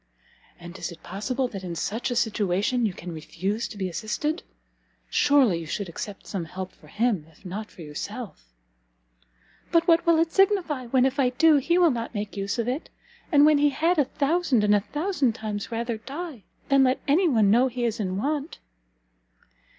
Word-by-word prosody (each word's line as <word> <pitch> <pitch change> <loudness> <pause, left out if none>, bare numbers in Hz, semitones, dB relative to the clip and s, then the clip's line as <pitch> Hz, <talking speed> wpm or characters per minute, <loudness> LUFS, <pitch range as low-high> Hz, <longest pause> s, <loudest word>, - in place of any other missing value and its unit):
"And 175 +2 -10
is - - -4
it 170 - -13
possible 250 +8 -2
that 195 -4 -7
in 175 -2 -5
such 225 +9 -2
a 245 - -2
situation 215 +2 +1
you 195 - -4
can 175 - -7
refuse 185 +8 -3
to 215 - -10
be 190 -2 -2
assisted? 235 - -2 0.7
Surely 270 -12 +4
you 165 - -7
should 200 +5 -3
accept 195 +4 -7
some 185 -5 -4
help 185 +3 -6
for - - -20
him, 210 -9 0
if 160 +4 -24
not 210 +4 -5
for 170 - -12
yourself." 105 - -7 1.2
"But 335 0 +3
what 335 -1 +5
will 335 -1 +5
that 325 0 +2
signify 370 - +2
when, 255 +1 +3
if 270 +2 0
I 255 -2 +4
do, 305 +4 +5
he 340 +6 +2
will 345 -3 +5
not 235 -1 -4
make 205 -2 -4
use 200 +3 -2
of 235 -1 -1
it? 265 +7 -3 0.4
and 290 -2 +6
when 305 -1 +5
he 290 0 +4
had 325 +4 +1
a 290 - +4
thousand 285 -3 +1
and 210 0 +4
a 205 - +5
thousand 295 - -1
times 215 -1 -5
rather 235 0 -2
die, 280 - -7 0.2
than 275 -1 +5
let 255 0 +2
any 330 +5 +4
one 220 -7 +4
know 245 +4 +5
he 250 -1 -4
is 225 -2 -1
in 190 -3 -2
want?" 290 +6 -2
235 Hz, 195 wpm, -25 LUFS, 200-290 Hz, 1.2 s, and